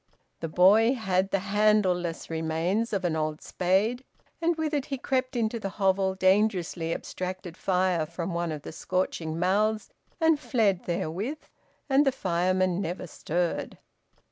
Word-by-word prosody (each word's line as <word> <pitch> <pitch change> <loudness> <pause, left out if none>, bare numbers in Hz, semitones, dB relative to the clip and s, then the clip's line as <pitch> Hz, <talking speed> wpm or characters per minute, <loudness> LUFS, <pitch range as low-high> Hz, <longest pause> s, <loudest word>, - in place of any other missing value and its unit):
The 165 - -4
boy 210 - +5
had 190 -4 0
the 195 - +1 0.2
handle 210 -2 +4
less 175 -2 -4
remains 165 +7 -1
of 195 -3 -1
an 165 -2 +1
old 155 -1 -2
spade, 200 +8 0 0.4
and 335 +1 +2
with 315 -1 -2
it 285 -2 -1
he 275 - -3
crept 255 0 -1
into 230 -1 0
the 195 - -3
hovel, 190 -1 +2
dangerously 185 -3 +1
abstracted 185 -1 -5
fire 180 -4 +1
from 170 +2 -4
one 170 -1 -1
of 150 -2 -6
the - - -7
scorching 165 -2 -2
mouths, 210 +5 +1 0.3
and 320 -2 +4
fled 220 -10 +1
therewith, 185 - -3 0.4
and 275 0 +4
the 270 - +3
fireman 185 -2 0
never 180 -1 -4
stirred. 170 +1 -2
190 Hz, 150 wpm, -27 LUFS, 175-220 Hz, 0.4 s, boy